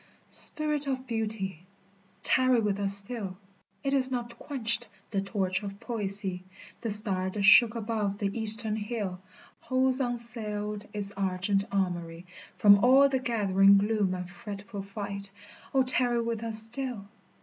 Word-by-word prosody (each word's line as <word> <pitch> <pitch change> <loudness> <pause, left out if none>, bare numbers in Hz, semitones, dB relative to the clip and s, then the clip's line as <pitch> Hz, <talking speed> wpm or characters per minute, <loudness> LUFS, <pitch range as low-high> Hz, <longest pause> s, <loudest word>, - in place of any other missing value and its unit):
Spirit 300 -2 0
of 260 -1 -2
Beauty! 215 -7 -4 0.6
tarry 255 -2 +3
with 205 -2 -1
us 200 0 +4
still, 200 -2 -3 0.5
It 275 0 -1
is 265 -2 +4
not 240 -2 -5
quenched 235 -5 -1 0.2
the 195 -2 0
torch 195 -2 -2
of 200 -1 -7
poesy, 200 -5 -2 0.4
The 230 - -3
star 200 -3 +3
that 200 +1 -3
shook 225 +4 +7
above 215 -3 -2
the 200 -1 -2
Eastern 220 -1 +2
hill 205 -4 -4 0.4
Holds 260 +1 0
unassailed 215 -4 -4
its 200 -1 -4
argent 195 0 -1
armory 175 -3 -2 0.3
From 200 0 +6
all 270 +3 +6
the 265 -1 0
gathering 200 -5 +4
gloom 205 -2 +1
and 180 -1 -6
fretful 205 +2 -8
fight 200 0 -6 0.2
— - - -21
O 265 - +5
tarry 250 -2 +2
with 230 -1 -2
us 225 -1 0
still 240 -2 -5
210 Hz, 145 wpm, -28 LUFS, 195-235 Hz, 0.6 s, shook